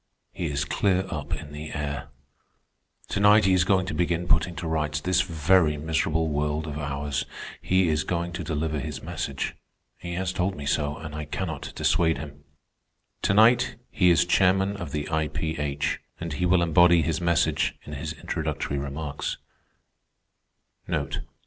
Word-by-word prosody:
"He 85 Hz, -, -3 dB
is 70 Hz, -1 st, -1 dB
clear 95 Hz, +4 st, +1 dB
up 75 Hz, -3 st, -5 dB
in 75 Hz, -2 st, -9 dB
the 75 Hz, +1 st, -7 dB
air. 70 Hz, -1 st, -3 dB, 1.0 s
Tonight 105 Hz, +1 st, +5 dB
he 95 Hz, -, +4 dB
is 90 Hz, -1 st, +4 dB
going 95 Hz, 0 st, +2 dB
to 90 Hz, -, -4 dB
begin 85 Hz, +1 st, 0 dB
putting 85 Hz, +2 st, +2 dB
to 85 Hz, -, -4 dB
rights 75 Hz, -2 st, 0 dB
this 90 Hz, +3 st, +2 dB
very 85 Hz, -2 st, +3 dB
miserable 80 Hz, +1 st, 0 dB
world 75 Hz, +1 st, -1 dB
of 75 Hz, -1 st, -5 dB
ours. 70 Hz, 0 st, -2 dB, 0.4 s
He 95 Hz, -1 st, +2 dB
is 80 Hz, -1 st, +1 dB
going 85 Hz, 0 st, -2 dB
to 90 Hz, 0 st, -4 dB
deliver 80 Hz, -1 st, -2 dB
his 75 Hz, -2 st, -5 dB
message. -, -, -3 dB, 0.4 s
He 85 Hz, 0 st, -5 dB
has 95 Hz, 0 st, -1 dB
told 90 Hz, +2 st, 0 dB
me 70 Hz, -, -7 dB
so, 75 Hz, 0 st, 0 dB
and 80 Hz, -2 st, -8 dB
I 75 Hz, 0 st, -4 dB
cannot 80 Hz, 0 st, -4 dB
dissuade 80 Hz, -2 st, +2 dB
him. 70 Hz, -2 st, -9 dB, 0.8 s
To 100 Hz, -, +2 dB
night 115 Hz, +3 st, +5 dB, 0.2 s
he 90 Hz, -2 st, +4 dB
is 85 Hz, 0 st, +5 dB
chairman 95 Hz, +2 st, +3 dB
of 85 Hz, -7 st, -6 dB
the 75 Hz, 0 st, -3 dB
I.P.H., 75 Hz, -2 st, -1 dB, 0.2 s
and 85 Hz, -2 st, -4 dB
he 90 Hz, +5 st, 0 dB
will 90 Hz, -1 st, +4 dB
embody 85 Hz, 0 st, +5 dB
his 80 Hz, +2 st, -1 dB
message 85 Hz, -1 st, +2 dB
in -, -, -8 dB
his -, -, -4 dB
introductory 70 Hz, -, -3 dB
remarks. 70 Hz, +1 st, -4 dB
80 Hz, 160 wpm, -26 LUFS, 75-90 Hz, 1.0 s, Tonight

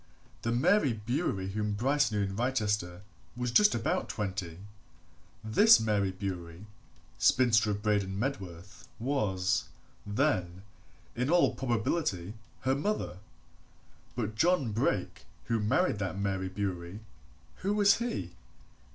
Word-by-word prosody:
The 115 Hz, -, -1 dB
Mary 130 Hz, -, +3 dB
Bewery 110 Hz, -, -2 dB
whom 105 Hz, +1 st, -2 dB
Bryce 135 Hz, +4 st, +1 dB
knew 105 Hz, -1 st, 0 dB
in 95 Hz, 0 st, -3 dB
Wrychester 105 Hz, -7 st, -1 dB, 0.3 s
was 125 Hz, 0 st, -2 dB
just 210 Hz, -, +5 dB
about 115 Hz, -, -1 dB
twenty 95 Hz, -5 st, -4 dB, 0.9 s
this 205 Hz, -, +6 dB
Mary 105 Hz, -3 st, +1 dB
Bewery, 95 Hz, -1 st, -6 dB, 0.5 s
spinster, 115 Hz, -4 st, +4 dB
of 105 Hz, 0 st, -2 dB
Braden 100 Hz, -3 st, 0 dB
Medworth, 100 Hz, -7 st, -5 dB
was, 100 Hz, -7 st, 0 dB, 0.4 s
then, 105 Hz, -, -1 dB, 0.5 s
in 125 Hz, +3 st, -1 dB
all 175 Hz, +1 st, +4 dB
probability, 110 Hz, -, -1 dB, 0.3 s
her 130 Hz, -, +1 dB
mother. 145 Hz, -, -2 dB, 1.0 s
But 110 Hz, -3 st, -2 dB
John 140 Hz, 0 st, +2 dB
Brake 100 Hz, -5 st, -1 dB, 0.2 s
who 115 Hz, -1 st, -1 dB
married 110 Hz, -, +1 dB
that 95 Hz, -1 st, -3 dB
Mary 95 Hz, -1 st, -2 dB
Bewery 95 Hz, 0 st, -4 dB, 0.6 s
who 200 Hz, +2 st, -1 dB
was 205 Hz, -1 st, +5 dB
he? 225 Hz, -, -3 dB
105 Hz, 115 wpm, -30 LUFS, 95-130 Hz, 1.0 s, this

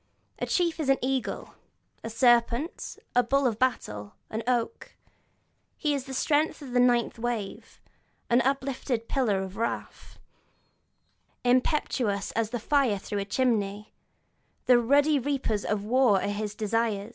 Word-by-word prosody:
A -, -, -2 dB
chief 340 Hz, -3 st, +1 dB
is 295 Hz, -4 st, -1 dB
an 270 Hz, -, +5 dB
eagle, 260 Hz, 0 st, -2 dB, 0.5 s
a 225 Hz, -, -4 dB
serpent, 240 Hz, +5 st, +1 dB, 0.2 s
the 245 Hz, -, +6 dB
bull 275 Hz, +3 st, +1 dB
of 230 Hz, -3 st, 0 dB
battle, 105 Hz, -, -1 dB, 0.2 s
an 220 Hz, -, -2 dB
oak; 250 Hz, -, -1 dB, 0.8 s
he 300 Hz, -1 st, 0 dB
is 275 Hz, -2 st, -3 dB
the 270 Hz, -, -7 dB
strength 300 Hz, +3 st, +1 dB
of 265 Hz, -, -8 dB
the 245 Hz, -, +2 dB
ninth 240 Hz, -2 st, +2 dB
wave, 230 Hz, -4 st, -4 dB, 0.5 s
an 240 Hz, +2 st, +4 dB
uplifted 260 Hz, -3 st, -1 dB
pillar 210 Hz, -8 st, +1 dB
of 190 Hz, 0 st, -8 dB
wrath, 230 Hz, -, -4 dB, 1.3 s
impetuous 245 Hz, -5 st, +1 dB
as 225 Hz, -2 st, -1 dB
the 240 Hz, +1 st, -3 dB
fire 260 Hz, -3 st, +2 dB
through 205 Hz, +1 st, -4 dB
a 200 Hz, -, -2 dB
chimney; 210 Hz, -3 st, -1 dB, 0.7 s
the 250 Hz, -1 st, +6 dB
ruddy 285 Hz, +5 st, +3 dB
reapers 255 Hz, -6 st, -1 dB
of 210 Hz, -1 st, -1 dB
war 240 Hz, -3 st, +4 dB
are 200 Hz, -, -2 dB
his 205 Hz, 0 st, -3 dB
desire. 220 Hz, -1 st, -1 dB
240 Hz, 145 wpm, -27 LUFS, 215-270 Hz, 1.3 s, the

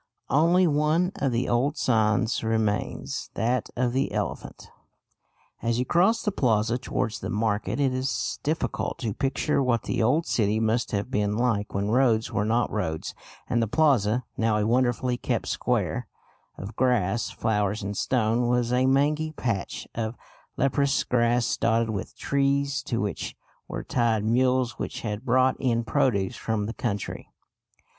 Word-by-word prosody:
Only 170 Hz, +5 st, +4 dB
one 155 Hz, +4 st, +2 dB
of 135 Hz, -, 0 dB
the 120 Hz, +1 st, 0 dB
old 135 Hz, +6 st, +1 dB
signs 110 Hz, 0 st, +1 dB
remains, 110 Hz, -2 st, -1 dB
that 120 Hz, +1 st, 0 dB
of 125 Hz, -1 st, 0 dB
the 135 Hz, +2 st, 0 dB
elephant. 105 Hz, -4 st, -4 dB, 0.9 s
As 115 Hz, 0 st, 0 dB
you 125 Hz, -, 0 dB
cross 190 Hz, -, +3 dB
the 210 Hz, -, 0 dB
plaza 115 Hz, -, +1 dB
towards 110 Hz, -4 st, -2 dB
the -, -, -5 dB
market, 105 Hz, +3 st, -1 dB
it 135 Hz, -2 st, +2 dB
is 130 Hz, +1 st, -2 dB
difficult 155 Hz, +2 st, -2 dB
to 110 Hz, -4 st, -3 dB
picture 140 Hz, +3 st, 0 dB
what 120 Hz, -3 st, +1 dB
the -, -, -1 dB
old 145 Hz, +9 st, +2 dB
city 110 Hz, -1 st, +1 dB
must 115 Hz, +2 st, +1 dB
have 105 Hz, +4 st, -2 dB
been 105 Hz, -3 st, 0 dB
like 115 Hz, -5 st, 0 dB
when 100 Hz, +2 st, 0 dB
roads 115 Hz, -3 st, +2 dB
were 105 Hz, -, 0 dB
not 115 Hz, +2 st, +1 dB
roads 80 Hz, -7 st, -3 dB, 0.3 s
and 120 Hz, -, +1 dB
the 115 Hz, -, +1 dB
plaza, 125 Hz, -4 st, +2 dB
now 110 Hz, -1 st, +2 dB
a 105 Hz, -, +1 dB
wonderfully 125 Hz, +1 st, +1 dB
kept -, -, -2 dB
square -, -, -1 dB, 0.5 s
of 100 Hz, +4 st, -8 dB
grass, 120 Hz, -4 st, +1 dB
flowers 105 Hz, -1 st, -1 dB
and 100 Hz, +1 st, -4 dB
stone, 120 Hz, +1 st, +1 dB
was 120 Hz, 0 st, +1 dB
a 130 Hz, +1 st, +3 dB
mangy 150 Hz, +4 st, +2 dB
patch 115 Hz, -9 st, -3 dB
of 115 Hz, 0 st, -3 dB, 0.4 s
leprous 140 Hz, 0 st, +2 dB
grass 120 Hz, 0 st, +1 dB
dotted 115 Hz, -1 st, +1 dB
with 100 Hz, -, -5 dB
trees, 140 Hz, 0 st, 0 dB
to 115 Hz, -, -2 dB
which 105 Hz, -1 st, -3 dB, 0.3 s
were -, -, -5 dB
tied 115 Hz, -4 st, +1 dB
mules 125 Hz, +1 st, +1 dB
which -, -, -4 dB
had 105 Hz, 0 st, -4 dB
brought 130 Hz, +1 st, +3 dB
in 120 Hz, -3 st, +1 dB
produce 100 Hz, -3 st, +1 dB
from 110 Hz, -2 st, -2 dB
the 115 Hz, -, -4 dB
country. 105 Hz, -5 st, -4 dB
120 Hz, 155 wpm, -26 LUFS, 110-130 Hz, 0.9 s, Only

